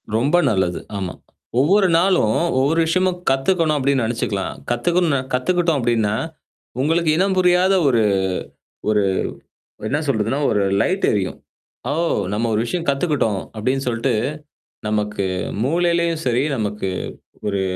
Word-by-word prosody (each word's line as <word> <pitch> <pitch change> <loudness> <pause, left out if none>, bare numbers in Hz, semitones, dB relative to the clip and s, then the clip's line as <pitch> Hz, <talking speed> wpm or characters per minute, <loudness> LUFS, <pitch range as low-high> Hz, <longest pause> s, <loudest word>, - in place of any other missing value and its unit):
ரொம்ப 135 +9 +2
நல்லது. 95 -5 0 0.2
ஆமா. 95 -2 -4 0.5
"ஒவ்வொரு 190 +8 +4
நாளும், 170 - +3 0.2
ஒவ்வொரு 145 +5 +2
விஷயமும் 185 +2 +1
கத்துக்கணும்," 155 +3 +1
அப்படின்னு 135 -2 +1
நெனைச்சுக்கலாம். 105 -4 -2 0.2
கத்துக்குண்ணு 165 +3 +1
கத்துக்கிட்டோம் 165 +4 +1
அப்படின்னா, 115 -4 +1 0.7
உங்களுக்கு 165 +2 +2
இனம் 190 +1 +2
புரியாத 180 +1 +4
ஒரு 120 -4 +3 0.9
ஒரு 105 -1 +3 0.9
என்ன 145 +6 0
சொல்றதுன்னா, 115 +1 0
ஒரு 105 -2 +2 0.2
லைட்டு 190 +2 +1
எரியும். 100 -3 -1 0.5
"ஓ! - - +1 0.4
நம்ம 115 +3 0
ஒரு 105 - +1
விஷயம் 170 +5 -3
கத்துக்கிட்டோம்," 140 - 0 0.2
அப்படின்னு 130 +5 -1
சொல்ட்டு, 120 +2 0 0.8
நமக்கு 105 -2 -1 0.4
மூளைலயும் 170 +2 +1
சரி, 125 +1 +2
நமக்கு 105 -4 -2 0.6
ஒரு 100 -1 -1
135 Hz, 120 wpm, -20 LUFS, 110-170 Hz, 0.9 s, ஒவ்வொரு